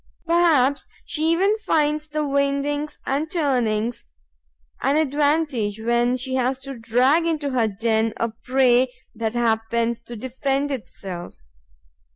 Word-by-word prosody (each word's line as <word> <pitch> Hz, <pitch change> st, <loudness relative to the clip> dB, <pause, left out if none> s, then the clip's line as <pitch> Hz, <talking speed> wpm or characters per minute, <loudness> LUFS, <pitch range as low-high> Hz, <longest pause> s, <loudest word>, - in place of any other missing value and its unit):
Perhaps 325 Hz, -6 st, +3 dB, 0.2 s
she 315 Hz, +1 st, 0 dB
even 390 Hz, +5 st, +3 dB
finds 300 Hz, -5 st, +1 dB
the 305 Hz, 0 st, -2 dB
windings 280 Hz, +1 st, -1 dB
and 290 Hz, +4 st, -1 dB
turnings 245 Hz, -8 st, 0 dB, 0.7 s
an 275 Hz, +3 st, +2 dB
advantage, 285 Hz, -7 st, +1 dB
when 240 Hz, +2 st, +1 dB
she 260 Hz, +1 st, -4 dB
has 260 Hz, 0 st, +1 dB
to 270 Hz, +1 st, -7 dB
drag 250 Hz, +8 st, +2 dB
into 300 Hz, -4 st, -1 dB
her 240 Hz, -3 st, +2 dB
den 220 Hz, +2 st, 0 dB
a 230 Hz, -, 0 dB
prey 250 Hz, +2 st, +2 dB, 0.2 s
that 225 Hz, 0 st, -3 dB
happens 230 Hz, 0 st, 0 dB
to 235 Hz, +1 st, -10 dB
defend 270 Hz, +4 st, -2 dB
itself. 190 Hz, -8 st, -7 dB
260 Hz, 125 wpm, -23 LUFS, 235-295 Hz, 0.7 s, Perhaps